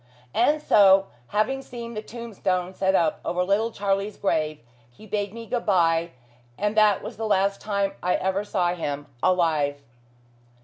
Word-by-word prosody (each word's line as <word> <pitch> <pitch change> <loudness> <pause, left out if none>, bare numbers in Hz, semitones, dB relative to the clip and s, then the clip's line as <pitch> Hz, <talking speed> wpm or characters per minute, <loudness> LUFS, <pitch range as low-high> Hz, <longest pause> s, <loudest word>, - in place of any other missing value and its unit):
And 295 +6 +2
so, 195 -2 +5 0.2
having 240 +6 0
seen 235 -3 -8
the 215 - -4
tombstone 195 -6 -3
set 190 0 +1
up 165 -4 +2
over 180 +1 0
little 200 +5 +1
Charlie's 200 -1 -2
grave, 155 -5 0 0.3
he 120 - -16
bade 205 -1 -2
me 230 +1 -8
good 235 +1 -2
bye, 170 -3 +3 0.5
and 210 +1 -1
that 215 -2 +4
was - - -7
the 225 0 -2
last 200 -1 +1
time 200 -2 -1
I 180 - +1
ever 190 +2 -1
saw 180 -4 0
him, 145 -4 -4 0.2
alive. 150 -5 +1
195 Hz, 160 wpm, -25 LUFS, 180-215 Hz, 0.5 s, so